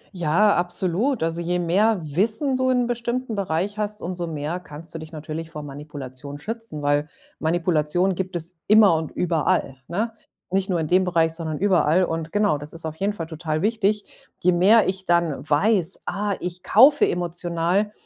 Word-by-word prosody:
Ja, 175 +5 +3
absolut. 180 +6 0
Also, 165 +1 -1
je 175 +1 -1
mehr 195 +6 +2
Wissen 215 - +1
du 260 0 +1
in 250 -1 +2
bestimmten 240 0 -2
Bereich 195 +2 -2
hast, 210 0 -3
umso 175 0 -3
mehr 155 +2 -3
kannst 165 -1 -9
du 160 - -5
dich 155 +1 -10
natürlich 160 +1 -6
vor 150 -2 -7
Manipulation 140 -1 -7
schützen, 215 -4 -6
weil 145 +1 +1 0.3
Manipulation 170 +2 +1
gibt 185 0 -4
es 170 0 -2
immer 210 -3 +6
und 160 -1 -2
überall, 160 -5 0
ne? 215 +7 -2 0.4
Nicht 195 +1 0
nur 175 - +1
in 155 - -2
dem 185 +3 +3
Bereich, 165 -3 +1
sondern 160 -2 -3
überall 185 -3 +3
und 165 -2 -3
genau, 205 -8 +1
das 150 +2 -8
ist 165 -1 -7
auf 160 0 -4
jeden 200 +2 0
Fall 170 -5 -5
total 160 0 -3
wichtig. 210 -1 +1 0.3
Je 180 - +3
mehr 200 +6 +5
ich 190 0 -3
dann 170 -4 +1
weiß: 185 +3 +2
„Ah, 205 0 -2
ich 180 0 -5
kaufe 275 +7 +5
emotional.“, 175 +3 -1
175 Hz, 175 wpm, -23 LUFS, 160-205 Hz, 0.4 s, immer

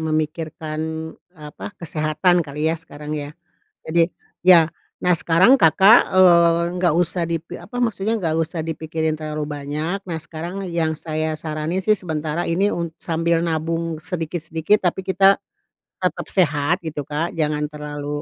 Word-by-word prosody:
memikirkan, 155 0 -3 0.6
apa, 150 +3 -8
kesehatan 165 +2 +1
kali 150 0 -1
ya, 165 - -4
sekarang 150 -2 -8
ya? 150 +1 -5 0.5
Jadi, 165 +2 +1 0.3
ya, 170 -3 +7 0.3
nah, 180 -1 +3
sekarang 185 +10 +5
Kakak, 195 +8 +6
eee, 170 -2 +6
nggak 175 -3 +2
usah 175 0 +1
dipi 165 +1 -4
apa 245 +4 -7
maksudnya, 225 -2 0
nggak 160 -2 0
usah 165 0 -2
dipikirin 160 -1 -2
terlalu 155 -1 -4
banyak. 150 +5 -3
Nah, 165 -3 -4
sekarang 170 +5 -6
yang 165 -2 0
saya 155 0 -3
saranin 155 +3 -3
sih 215 +2 +3
sementara 160 -1 -3
ini 190 +5 +1
un 170 -3 -3
sambil 165 0 0
nabung 165 0 -2
sedikit-sedikit, 165 +3 -1
tapi 190 - -7
kita 195 +1 +3 0.6
tetap - - -2
sehat, 150 -2 +2
gitu, 150 -2 -3
Kak. 150 +4 -3
Jangan 150 -2 0
terlalu 145 0 -5
165 Hz, 140 wpm, -21 LUFS, 155-175 Hz, 0.6 s, ya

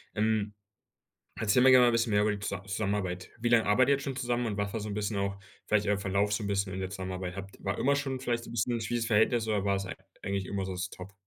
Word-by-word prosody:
Ähm, 105 -1 0 0.8
erzähl 110 +3 +2
mir 130 0 +7
gerne 125 -1 +8
mal - - +5
'n - - -2
bisschen 115 -1 +1
mehr 105 0 +4
über 105 - +2
die 100 - -2
Z 100 -1 -5
Zusammenarbeit. 95 -3 -2
Wie 120 - +1
lange 115 -1 +4
arbeitet 120 +6 +4
ihr - - +5
jetzt 140 - -4
schon 135 -2 -3
zusammen 120 -2 -1
und 105 -3 -2
was 100 -1 -2
war 115 - -2
so 105 - -5
'n 100 - -4
bisschen 105 0 -2
auch, 100 0 -1 0.3
vielleicht 105 -1 +2
der 100 -1 +2
Verlauf 100 +1 0
so 105 0 -1
'n - - -2
bisschen 100 -1 -1
in 95 - -4
der 95 0 -3
Zusammenarbeit? 95 -1 -5
Habt 100 0 -8
war 100 -1 -1
immer 140 +1 +2
schon 135 -2 -2
vielleicht 120 -2 -1
so - - -10
'n - - -8
bisschen 120 +2 0
'n 115 - -1
schwieriges 115 +1 -1
Verhältnis 110 +1 +3
oder 105 -2 +1
war 100 -1 +2
es 95 0 -2
eig - - -6 0.3
eigentlich 100 -1 -2
immer 100 -1 -2
so - - -5
das 90 0 -4
ist 95 - -4
top? 95 +2 -10
105 Hz, 300 wpm, -30 LUFS, 100-115 Hz, 0.8 s, gerne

